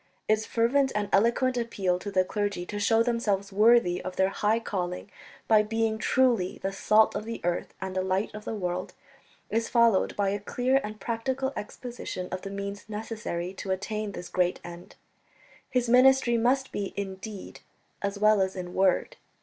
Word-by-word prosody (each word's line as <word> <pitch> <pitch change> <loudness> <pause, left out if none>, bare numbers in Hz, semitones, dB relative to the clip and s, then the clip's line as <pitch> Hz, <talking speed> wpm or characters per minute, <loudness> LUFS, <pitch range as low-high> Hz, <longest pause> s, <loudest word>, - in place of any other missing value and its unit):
Its 215 0 +1
fervent 260 +4 +2
and 205 -1 -1
eloquent 235 +5 +3
appeal 195 -6 -1
to 205 - -6
the 185 -2 +2
clergy 205 -3 -2
to 205 +2 -5
show 225 +2 +3
themselves 205 -5 -1
worthy 210 -4 +4
of 185 0 -5
their 190 0 +2
high 210 +3 +1
calling, 185 -3 -4 0.4
by 215 -1 +6
being 220 0 -1
truly 235 -8 +2
the 195 0 -1
"salt 215 +2 +4
of - - -2
the 230 +1 -5
earth 175 0 -2
and 190 0 -5
the 185 - +1
light 190 +2 -1
of 210 0 -8
the 225 - -4
world," 180 -2 -3 0.6
is 225 +1 0
followed 235 -5 +3
by 200 -1 +1
a 200 +1 -1
clear 255 +6 +1
and 215 0 -7
practical 260 +5 -2
exposition 215 -4 -6
of 185 0 -4
the 195 - -6
means 200 +1 -6
necessary 210 -5 -4
to 195 - -7
attain 205 +2 -2
this 180 - -7
great 180 -1 0
end. 175 0 -10 0.7
His 250 -2 0
ministry 250 0 +5
must 255 +4 +1
be 200 -2 -4
in 195 -1 -4
deed 205 -1 -9 0.4
as 200 0 -2
well 215 0 +4
as 190 0 0
in 180 -1 -6
word. 190 -1 +1
210 Hz, 180 wpm, -27 LUFS, 190-230 Hz, 0.7 s, by